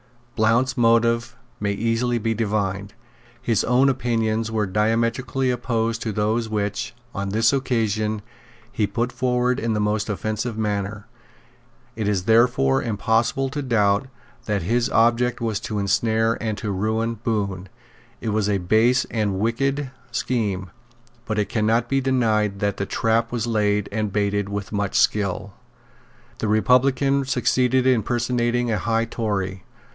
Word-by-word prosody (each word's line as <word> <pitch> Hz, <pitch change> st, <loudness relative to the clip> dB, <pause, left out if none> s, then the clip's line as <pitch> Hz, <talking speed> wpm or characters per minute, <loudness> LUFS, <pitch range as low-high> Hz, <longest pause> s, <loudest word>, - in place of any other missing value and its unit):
Blount's 115 Hz, +4 st, +2 dB
motives 115 Hz, 0 st, +2 dB, 0.2 s
may 100 Hz, -1 st, 0 dB
easily 115 Hz, +3 st, 0 dB
be 115 Hz, 0 st, 0 dB
divined. 100 Hz, -2 st, -2 dB, 0.4 s
His 115 Hz, -3 st, +1 dB
own 125 Hz, +3 st, +3 dB
opinions 115 Hz, -4 st, 0 dB
were 110 Hz, -1 st, 0 dB
diametrically 115 Hz, +6 st, 0 dB
opposed 115 Hz, -2 st, -1 dB
to 110 Hz, -, -2 dB
those 110 Hz, +2 st, 0 dB
which, 105 Hz, +2 st, -2 dB, 0.2 s
on 100 Hz, 0 st, -3 dB
this 110 Hz, +4 st, +2 dB
occasion, 110 Hz, -5 st, 0 dB, 0.5 s
he 110 Hz, -5 st, 0 dB
put 120 Hz, +2 st, -2 dB
forward 125 Hz, 0 st, 0 dB
in 115 Hz, -1 st, -1 dB
the 105 Hz, -, 0 dB
most 105 Hz, +1 st, 0 dB
offensive 110 Hz, +3 st, -3 dB
manner. 105 Hz, -1 st, -2 dB, 0.9 s
It 110 Hz, -2 st, -2 dB
is 100 Hz, -3 st, 0 dB
therefore 110 Hz, -, +3 dB
impossible 115 Hz, +5 st, 0 dB
to 145 Hz, +2 st, -4 dB
doubt 105 Hz, -3 st, +2 dB, 0.4 s
that 105 Hz, -4 st, -1 dB
his 120 Hz, +7 st, +1 dB
object 120 Hz, +1 st, +2 dB
was 115 Hz, -4 st, -1 dB
to 105 Hz, -, -4 dB
ensnare 110 Hz, +3 st, +1 dB
and 110 Hz, -2 st, -2 dB
to 105 Hz, 0 st, -3 dB
ruin 110 Hz, +3 st, -1 dB
Bohun. 100 Hz, -4 st, -2 dB, 0.5 s
It 115 Hz, -, -2 dB
was 105 Hz, -1 st, 0 dB
a 100 Hz, -, +2 dB
base 110 Hz, +7 st, +3 dB
and 105 Hz, -4 st, 0 dB
wicked 135 Hz, +5 st, -1 dB, 0.2 s
scheme. 100 Hz, -7 st, -2 dB, 0.6 s
But 110 Hz, -, -2 dB
it 105 Hz, -, 0 dB
cannot 115 Hz, +2 st, +1 dB
be 135 Hz, +2 st, +1 dB
denied 110 Hz, -6 st, +1 dB
that 100 Hz, -1 st, 0 dB
the 100 Hz, -, -3 dB
trap 115 Hz, +1 st, +1 dB
was 120 Hz, -2 st, -1 dB
laid 105 Hz, -3 st, +1 dB
and 105 Hz, -1 st, -2 dB
baited 100 Hz, 0 st, 0 dB
with 100 Hz, 0 st, -4 dB
much 100 Hz, -2 st, -2 dB
skill. 100 Hz, -1 st, +1 dB, 0.9 s
The 110 Hz, -, -1 dB
republican 130 Hz, +5 st, +3 dB
succeeded 130 Hz, 0 st, +2 dB
in 130 Hz, -3 st, +4 dB
personating 120 Hz, 0 st, 0 dB
a 105 Hz, -, 0 dB
high 115 Hz, +2 st, 0 dB
Tory. 95 Hz, -5 st, -3 dB
110 Hz, 145 wpm, -23 LUFS, 105-120 Hz, 0.9 s, in